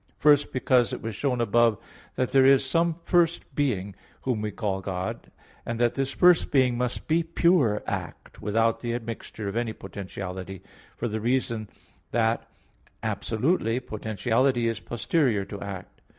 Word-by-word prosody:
First, 145 -1 +4
because 125 -2 +2
it - - -5
was 110 -2 -4
shown 125 +2 0
above 115 0 +3 0.4
that 130 - -1
there 135 -1 +5
is 135 0 +5
some 165 +4 +1
first 170 -4 +1
being, 105 -9 -1 0.3
whom 125 -5 -1
we 105 - -2
call 100 -2 -2
God; 95 -1 -4 0.3
and 115 0 -4
that 120 -1 +3
this 135 -1 -1
first 180 -2 +5
being 130 -3 +3
must 125 0 -2
be 165 +2 +3
pure 165 - +2
act, - - -6
without 115 +2 +1
the 120 -1 -2
admixture 115 -2 -6
of 100 - -4
any 115 -1 -1
potentiality, 95 -1 -7 0.3
for - - -2
the 110 -1 -3
reason 115 -2 0 0.4
that, 115 0 0 0.5
absolutely, 120 0 0
potentiality 115 +2 0
is 115 -2 -1
posterior 120 -2 0
to 100 - -8
act. 100 -2 -8
115 Hz, 150 wpm, -26 LUFS, 105-135 Hz, 0.5 s, there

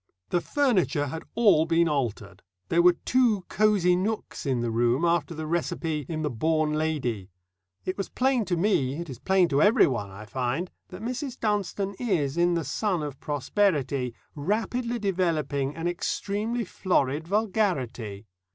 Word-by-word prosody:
The 175 - +1
furniture 185 - +1
had 160 +4 -5
all 200 -9 +5
been 170 +1 +3
altered 110 - -2 0.3
there 170 - +4
were 175 0 +5
two 235 -7 +2
"cosy 200 -4 +3
nooks" 205 -4 -3
in 130 -3 +1
the 120 -1 -1
room 120 +7 +2
after 170 -1 +1
the 155 0 -4
recipe 160 -2 -2
in 160 -1 -3
the 150 - 0
Born 155 +5 +1
Lady. 135 -11 -1 0.6
It 185 +2 -3
was 195 - -2
plain 255 -2 +1
to 175 -2 0
me, 165 -8 +1
it 170 -4 -5
is 120 - -9
plain 190 +1 +3
to 140 -1 +2
everyone, 125 - +4
I 100 +2 -10
find, 130 - -2 0.2
that 185 +3 -9
Mrs. 255 +2 -4
Dunstone 200 -2 -1
is, 170 - 0
in 175 0 +3
the 165 -3 -1
sun 190 -7 -1
of 145 -3 -6
prosperity, 140 - 0 0.2
rapidly 230 - -1
developing 160 - 0
an 165 +1 -2
extremely 210 +6 -2
florid 155 -4 0
vulgarity. 155 - -1
170 Hz, 155 wpm, -27 LUFS, 140-200 Hz, 0.6 s, all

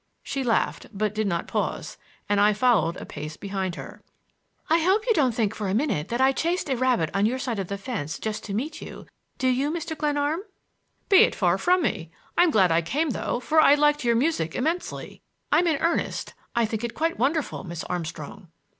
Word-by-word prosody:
She 275 -1 -3
laughed, 230 -3 0
but 210 0 -1
did 215 -1 -1
not 170 -3 -1
pause, - - -2 0.3
and 205 0 +2
I 210 +1 +5
followed 205 -7 +2
a - - -7
pace 155 +1 -7
behind 190 -3 -3
her. - - -9 0.7
"I 325 +2 +4
hope 380 +6 +2
you 470 - +4
don't 265 - +2
think 220 -3 +1
for 210 -2 -4
a 190 - 0
minute 220 - 0
that 235 +3 -2
I 265 +1 +5
chased 335 +1 -1
a - - +2
rabbit 245 -10 +1
on 200 +2 +3
your 250 +3 -1
side 245 -5 -3
of 190 - -3
the 200 - -4
fence 195 - -4
just 215 -1 -4
to 200 - -4
meet 295 +8 -3
you; - - -9 0.3
do 260 - 0
you, 260 +3 +2
Mr. 320 0 -3
Glenarm?" 295 +1 0 0.7
"Be 390 - +6
it - - +6
far 180 -1 +2
from 360 0 +3
me! 170 - -2 0.3
I'm 350 0 +5
glad 190 - +4
I 165 +1 +3
came, 285 - -1
though, 240 - -2
for 315 +5 +3
I 290 - +7
liked 295 -1 +2
your 235 -1 +3
music 235 - 0
immensely. 325 +7 -3 0.3
I'm 335 +4 +4
in 315 -3 +2
earnest; 335 - -1 0.2
I 235 -1 +3
think 220 +1 -4
it 235 - -4
quite 325 -3 -1
wonderful, 285 +1 0
Miss 170 -3 -6
Armstrong." 170 +2 -6
240 Hz, 210 wpm, -25 LUFS, 195-300 Hz, 0.7 s, I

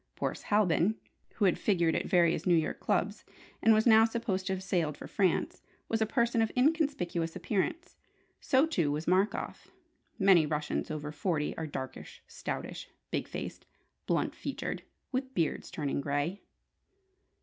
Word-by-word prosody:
Boris - - -3
Halbin 205 -1 +3 0.4
(who 210 - +2
had 185 - +3
figured 170 -5 +2
at - - -1
various 170 -1 +3
New 175 - +5
York 160 -1 0
clubs, - - 0 0.4
and 225 - +5
was 220 0 +4
now 220 -2 +7
supposed 225 -5 -1
to 190 - +1
have 190 0 -4
sailed 170 -5 0
for - - -8
France) 190 -3 0 0.3
was 225 0 0
a 220 - +3
person 235 0 +2
of 225 - +1
inconspicuous 250 - +1
appearance. 325 - -2 0.4
So, 265 +2 +3
too, 170 - 0
was 150 +2 -2
Markoff. 190 +4 0 0.5
Many 190 -6 +5
Russians 150 0 -2
over 150 -1 -4
forty 155 -2 -1
are 160 - -4
"darkish, 130 -3 -7
stoutish, - - -6 0.2
big - - -1
faced, - - -7 0.4
blunt - - +1
featured, - - -4 0.3
with 260 0 -3
beards 165 -3 -1
turning 145 -2 -2
grey!" 145 +7 -1
185 Hz, 150 wpm, -31 LUFS, 160-225 Hz, 0.5 s, now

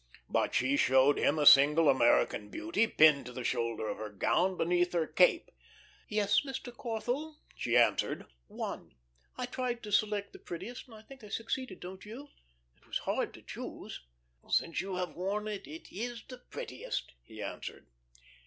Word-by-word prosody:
But - - 0
she 135 +3 +2
showed 130 +2 +4
him 150 - +2
a 150 - +1
single 150 +3 +8
American 120 -5 +3
Beauty, 325 -9 0
pinned 150 - +5
to - - -7
the 125 - -5
shoulder 115 -2 -1
of - - -4
her 110 -1 -5
gown 175 - +1
beneath 175 +1 +1
her 170 -2 +2
cape. 180 - +3 0.6
"Yes, 210 -1 +2
Mr. 265 -3 -6
Corthell," 245 +7 -3 0.2
she 120 0 +1
answered, 120 - +2 0.2
"one. - - -6 0.4
I 250 - -2
tried 245 -1 -3
to 210 - -7
select 205 -1 +1
the - - -11
prettiest, 235 +10 -7
and 230 - -13
I 215 - -13
think 265 0 -14
I 210 - -10
succeeded 230 -1 -4
don't 185 +1 -8
you? 250 +8 -9 0.5
It - - -27
was - - -1
hard - - -2
to - - -14
choose." - - -8 0.5
"Since 165 - +1
you 190 -1 -4
have 180 -3 -3
worn 200 +4 -2
it, 205 -8 -5
it 155 +3 -10
is 235 +4 -5
the 255 -1 -10
prettiest," 245 - -6
he - - -14
answered. - - -6
190 Hz, 170 wpm, -32 LUFS, 145-235 Hz, 0.6 s, single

